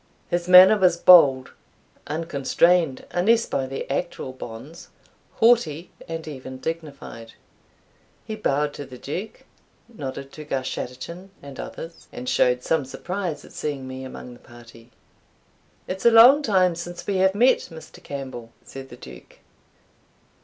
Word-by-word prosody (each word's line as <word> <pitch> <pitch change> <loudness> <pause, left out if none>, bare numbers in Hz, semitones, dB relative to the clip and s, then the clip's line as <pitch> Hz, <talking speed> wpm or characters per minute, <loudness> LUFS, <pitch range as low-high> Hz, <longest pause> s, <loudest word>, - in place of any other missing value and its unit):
His 175 0 -1
manner 185 +3 +8
was 180 -2 +3
bold, 145 -8 +6 0.6
unconstrained 165 0 +1
unless 225 +6 +2
by 135 -1 -2
the 135 +1 -6
actual 135 -1 -4
bonds, 130 +7 -10 0.5
haughty, 185 -9 +2 0.2
and 165 -1 -6
even 130 -3 -8
dignified. 140 -7 -7 0.9
He 220 - -5
bowed 150 -8 -1
to 145 - -8
the 130 - -11
Duke, 190 - -7 0.4
nodded 140 - -8
to 155 - -10
Garschattachin 145 +6 -5
and 140 -2 -11
others, 165 +1 -9
and 125 - -8
showed 125 0 +2
some 160 -3 0
surprise 170 +3 -5
at - - -16
seeing 140 -3 -5
me 130 0 -7
among 125 -1 -9
the 120 - -16
party. 120 0 -16 1.0
"It 190 +1 -5
is 235 - +6
long 250 +6 +7 0.3
since 175 +1 -8
we 200 -2 -1
have 190 +1 +2
met, 245 +5 +4
Mr. 160 -2 -13
Campbell," 130 -5 -8
said 135 0 -10
the 120 - -12
Duke. - - -14
150 Hz, 135 wpm, -23 LUFS, 130-180 Hz, 1.0 s, manner